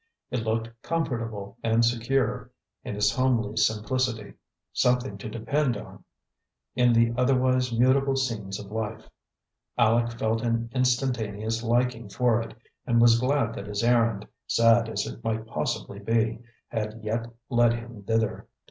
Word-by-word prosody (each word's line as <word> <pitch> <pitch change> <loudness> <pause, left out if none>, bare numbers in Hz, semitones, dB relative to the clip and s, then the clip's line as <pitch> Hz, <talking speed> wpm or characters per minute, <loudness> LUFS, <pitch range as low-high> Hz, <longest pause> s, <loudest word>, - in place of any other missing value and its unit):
It 125 - 0
looked 115 +1 -1
comfortable 115 -10 -3
and 115 +1 +3
secure, 120 +2 0 0.3
in - - -5
its 105 0 +3
homely 125 -4 +1
simplicity; 110 0 0 0.4
something 125 -3 +1
to 110 - -6
depend 120 +3 0
on - - -11 0.7
in 125 -1 +4
the 115 0 +3
otherwise 130 0 +2
mutable 130 +3 +3
scenes 110 -7 -2
of 100 -1 -10
life. 110 0 -4 0.7
Aleck 115 0 +2
felt 110 0 0
an 115 0 -1
instantaneous 120 -4 0
liking 120 -1 0
for 120 +1 +2
it, 115 -1 -8 0.3
and 120 -2 +3
was 115 0 +6
glad 130 -2 +1
that - - -7
his 105 +1 -2
errand, 115 -3 +2 0.2
sad 115 0 +4
as - - -2
it - - -8
might 110 0 -2
possibly 100 -2 -3
be, 115 +1 0 0.3
had 110 0 -4
yet 115 +2 -2 0.2
led 120 -1 +4
him 120 -2 -7
thither. 110 +1 -1
115 Hz, 140 wpm, -26 LUFS, 110-125 Hz, 0.7 s, was